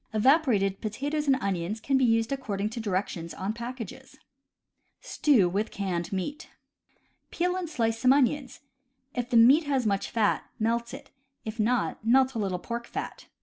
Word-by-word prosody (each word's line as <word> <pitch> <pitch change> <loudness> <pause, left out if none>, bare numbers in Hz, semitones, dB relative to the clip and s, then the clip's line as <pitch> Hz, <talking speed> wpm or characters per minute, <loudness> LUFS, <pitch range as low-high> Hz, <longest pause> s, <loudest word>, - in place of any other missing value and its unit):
Evaporated 215 - +3
potatoes 285 +7 -3
and 270 - +5
onions 195 +2 -2
can 275 +4 0
be 265 - +3
used 225 0 +2
accord 265 -8 -3
ing 205 +2 0
to 230 - -5
directions 185 -5 -3
on 195 +3 -3
packages. 245 +2 -8 0.8
Stew 290 - +2
ivith 205 +4 -1
Canned 180 -4 -3
Meat. 285 - -4 0.4
— - - -41
Peel 360 +1 -1
and 365 -3 -3
slice 225 -6 -1
some 255 +1 +4
onions. 275 0 +1 0.5
If 245 -1 -3
the 240 - +3
meat 270 +8 +6
has 270 -4 0
much 200 -2 0
fat, 220 -3 +1
melt 235 +1 -1
it; 280 0 -13 0.3
if 220 +1 -6
not, 225 0 0
melt 260 +3 +4
a 230 - -3
little 190 -3 -1
pork 235 +5 -5
fat. - - -6
235 Hz, 170 wpm, -27 LUFS, 210-270 Hz, 0.8 s, meat